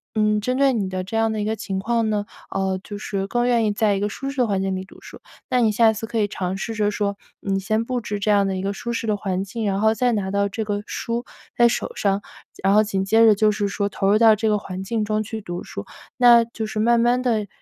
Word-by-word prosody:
嗯， 215 -1 +2
针 255 +4 -1
对 275 -1 +4
你 205 -5 -1
的 185 0 -3
这 200 - -7
样 225 -1 +1
一 210 - -1
个 220 +1 -1
情 195 -2 -4
况 230 +1 0
呢， 205 -1 -1 0.2
呃， 190 -1 -1
就 205 - -7
是 195 -2 -3
更 240 +4 0
愿 235 -2 +3
意 210 - +2
在 205 -1 +2
一 - - -1
个 205 - 0
舒 275 +6 -5
适 280 - -12
的 245 -2 +2
环 195 -2 0
境 195 0 -1
里 185 0 -5
读 - - -17
书， - - -12 0.3
那 250 - +2
你 220 -2 +3
下 225 +1 +4
次 220 +1 -5
可 235 - -4
以 205 - +2
尝 185 -1 -3
试 225 +3 -4
着 210 -1 +1
说 200 -1 -2 0.2
你 195 -1 -1
先 215 +3 0
布 250 0 -2
置 210 -2 -4
这 210 +1 +1
样 195 -2 +2
一 185 - -3
个 200 +1 -2
舒 235 +4 -5
适 230 - -3
的 210 -1 +1
环 190 -1 -2
境， 220 +3 -5
然 195 -1 0
后 220 0 +4
再 245 +1 +1
拿 195 -3 -2
到 200 0 +1
这 220 +3 -3
个 205 -1 -2
书 235 +1 -3 0.3
在 240 0 +5
手 235 - -2
上， 200 0 0 0.4
然 195 +1 +4
后 215 - +6
紧 195 -2 -1
接 225 +3 +5
着 215 -2 +6
就 215 +1 +3
是 205 -1 -1
说 200 0 -1
投 195 0 -1
入 210 - +5
到 225 -1 +6
这 220 +1 0
个 210 - +2
环 190 -2 -6
境 220 +1 -1
中 215 0 0
去 220 +1 -5
读 175 -2 -6
书。 - - -7 0.3
那 240 -2 +7
就 225 -1 -5
是 215 0 -4
慢 235 +1 +3
慢 240 +2 +2
地， 220 -5 0
210 Hz, 300 characters per minute, -22 LUFS, 200-230 Hz, 0.4 s, 那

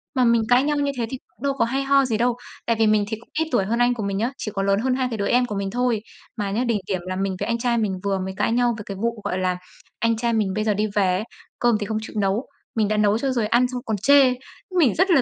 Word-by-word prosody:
Mà 255 - +3
mình 235 -1 +4
cãi 245 +2 +5
nhau 295 +1 0
như 285 -1 +1
thế 235 - 0
thì 265 - -4
cũng - - -19
đâu 280 -1 +1
có 260 -4 +1
hay 265 +4 -1
ho 275 0 +4
gì 225 -4 0
đâu. 240 +1 +1 0.3
Tại 230 - +2
vì 220 - +4
mình 215 -1 +3
thì 220 +1 -3
cũng 235 - -20
ít 320 - +1
tuổi 220 -7 +2
hơn 230 +4 -1
anh 245 0 +4
của 225 -3 -4
mình 200 -1 -2
nhá, 230 +5 0
chỉ 215 - -4
có 195 - 0
lớn 195 0 +2
hơn 255 +3 +1
hai 260 -1 0
cái 225 - -2
đứa 200 -1 -1
em 245 +1 +3
của 210 -4 -5
mình 195 0 -2
thôi. 245 -1 +1 0.4
Mà 205 -2 -2
nhá, 225 +5 0
đỉnh 230 -4 +1
điểm 185 -3 -1
là 185 - -2
mình 195 0 -1
với 205 - -2
anh 235 0 0
trai 235 0 0
mình 200 -5 -1
vừa 195 -1 0
mới 190 0 -4
cãi 210 - +1
nhau 240 0 +2
về 210 - -7
cái 195 - -6
vụ, 230 +1 -2
gọi 185 - -2
là, 185 -1 0 0.4
anh 230 0 +1
trai 235 +1 0
mình 210 -4 +1
bây 215 - -1
giờ 215 -1 +2
đi 210 +2 0
về 190 -3 +3
ấy, 200 - -3 0.4
cơm 240 -2 +3
thì 205 - -2
không 215 +1 -2
chịu 220 - -9
nấu, 200 +5 0 0.3
mình 220 -2 +2
đã 215 +1 0
nấu 210 0 +3
cho 270 +3 -1
rồi 235 -4 0
ăn 240 +3 +3
xong 250 0 -5
còn 220 -2 -1
chê. 270 +4 +5 0.5
Mình 265 - +4
rất 370 +3 +3
là 300 -6 +6
225 Hz, 320 wpm, -23 LUFS, 205-245 Hz, 0.5 s, là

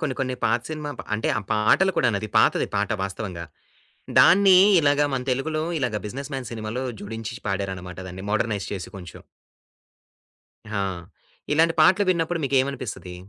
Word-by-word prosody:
కొన్ని 150 -6 -2
కొన్ని 130 -1 -1
పాత 115 +2 +2
సినిమా 150 -1 -5
ప్ - - -5
అంటే 110 - -1
ఆ - - -3
పాటలు 110 - +3
కూడా 125 - +3 0.3
పాతది - - +3
పాట 100 0 0
వాస్తవంగా. 95 -3 -5 0.7
దాన్ని 190 +1 +7 0.2
ఇలాగ 145 -1 +2
మన 130 -1 -1
తెలుగులో 155 +5 -1 0.2
ఇలాగా 125 -6 -1
'బిజినెస్ 135 +7 -6
మ్యాన్' 130 -4 -5
సినిమాలో 115 +3 -4 0.2
జోడించి 115 +3 -6
పాడారన్నమాట 95 -2 -4
దాన్ని 95 +2 -8
మోడ్రనైజ్ 105 -1 -1
చేసి 95 -3 -5
కొంచెం. 90 -3 -11 1.5
హా! 100 -2 0 0.7
ఇలాంటి 165 +2 +3
పాటలు 190 +3 +5
విన్నప్పుడు 170 0 0
మీకేమనిపిస్తది? 130 -9 -2
125 Hz, 140 wpm, -24 LUFS, 100-150 Hz, 1.5 s, దాన్ని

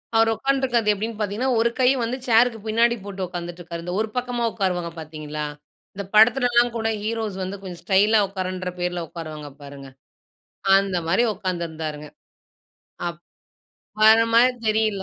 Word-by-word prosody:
அவர் 225 0 +5
உட்காந்துட்டு 270 +4 0
இருக்குறது 235 -4 +2
எப்படின்னு 220 +2 -4
பார்த்தீங்கன்னா, 210 +5 -1
ஒரு 235 +1 +3
கை 255 - +4 0.2
வந்து 235 +3 -2
சேருக்கு 230 0 +4
பின்னாடி 230 +2 +3
போட்டு 195 -2 -4
உட்காந்துட்டு 175 0 -7
இருக்காரு. 170 0 -7
இந்த 180 - -4
ஒரு 220 - -2
பக்கமா 245 -1 -2
உட்காருவாங்க 180 -5 -2
பார்த்தீங்களா? 155 -1 -6 0.5
இந்த 200 - -4
படத்துலலாம் 240 +1 +5
கூட 225 -1 -1 0.2
ஹீரோஸ் 220 -3 -3
வந்து 190 +2 -5
கொஞ்சம் 180 -3 -8
ஸ்டைலா 210 +3 +4
உட்கார்றன்ற 185 -1 -4
பேருல 175 -1 -2
உட்காருவாங்க 155 -3 -8
பாருங்க. 140 -1 -10 0.9
அந்த 195 -1 +1
மாதிரி 190 +8 +3
உட்காந்துருந்தாருங்க. 160 -6 -4 1.0
அப் 170 0 -8 0.8
வர 220 +1 +8 0.2
மாரி 250 +2 +6 0.2
தெரியில்ல. 215 -2 +1
200 Hz, 145 wpm, -23 LUFS, 175-225 Hz, 1.0 s, வர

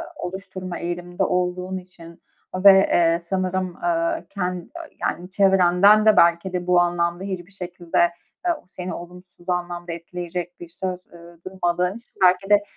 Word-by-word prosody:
oluşturma 185 -3 -6
eğiliminde 175 +1 -3
olduğun 180 +1 -1
için 175 -2 -13 0.3
ve, 195 +2 +8
eee, 170 -3 +4
sanırım, 185 0 -2
aaa, 165 -1 0
ken 180 -3 -4 0.3
yani 180 +2 -2
çevrenden 195 +2 +5
de 215 -1 +5
belki 170 +2 +4
de 180 0 -3
bu 180 -1 +5
anlamda 175 +1 0
hiçbir 185 -1 -6
şekilde, 175 -3 -4 0.5
eee, 350 - +3
seni 180 -1 -6
olumsuz 180 +1 -11
anlamda 175 -1 -3
etkileyecek 175 +1 -6
bir 175 - -10
söz, 180 +1 -4
ııı, 170 0 -15
duymadığın 180 0 -1
için 235 +2 -13
belki 185 +2 +4
de, 205 0 +5
180 Hz, 140 wpm, -23 LUFS, 175-185 Hz, 0.5 s, ve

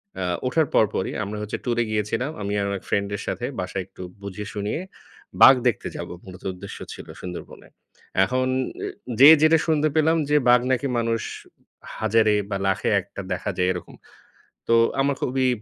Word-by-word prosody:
অ্যা 95 - -3 0.2
ওঠার 155 +3 +2
পর 110 - +5
পরই - - -1
আমরা 105 +2 -5
হচ্ছে 105 - -4
টুরে 120 -1 +1
গিয়েছিলাম। 110 +7 -1
আমি 100 +1 -2
আর 100 - 0
আমার 100 -1 -3
ফ্রেন্ড 100 -1 0
এর 100 - -5
সাথে 120 - -2
বাসায় 90 +1 -3
একটু 95 -1 -14 0.2
বুঝিয়ে-শুনিয়ে। 105 - -4 0.6
বাঘ 135 - +10
দেখতে 115 - 0
যাবো - - -6
মূলত 90 -1 -12
উদ্দেশ্য 90 - -9 0.2
ছিল - - -10
সুন্দরবনে। 90 -1 -8 0.6
এখন 130 +4 0 0.4
এ - - -3 0.3
যে, 140 - +10
যেটা 160 +1 +6
শুনতে 155 -1 +2
পেলাম 160 +1 +3
যে, 150 - +3
বাঘ 125 0 +6
নাকি 135 +2 +1
মানুষ 115 -1 0 0.8
হাজারে 110 0 +3 0.2
বা 100 - -1
লাখে 95 - 0
একটা 100 +1 -9
দেখা 90 +3 -2
যায় 90 0 +2
এরকম। 90 - -8 0.7
তো 115 - +4 0.3
আমার 140 0 +2
খুবই 130 0 +1
110 Hz, 170 wpm, -24 LUFS, 100-130 Hz, 0.8 s, বাঘ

